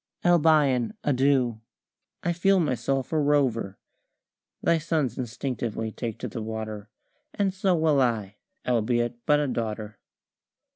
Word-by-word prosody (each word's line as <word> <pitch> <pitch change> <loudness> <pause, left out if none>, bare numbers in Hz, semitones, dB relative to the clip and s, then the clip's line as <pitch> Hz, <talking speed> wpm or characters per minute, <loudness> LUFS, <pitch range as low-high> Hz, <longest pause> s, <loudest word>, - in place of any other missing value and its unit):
Albion, 150 -8 +3
adieu! 130 -4 +2 0.6
I 175 - +1
feel 190 +3 +3
myself 135 -2 -1
a 155 - +2
rover. 135 -9 +1 0.9
Thy 170 - +3
sons 155 -5 -1
instinctively 115 -2 -3
take 115 -1 -5
to - - -5
the 115 - -6
water, 110 -1 -5 0.5
And 195 -2 +1
so 190 -1 +1
will 155 -4 +3
I, 105 -5 -1 0.3
albeit 120 0 0
but 150 0 +5
a 145 - 0
daughter." 110 -3 -4
125 Hz, 125 wpm, -26 LUFS, 115-150 Hz, 0.9 s, but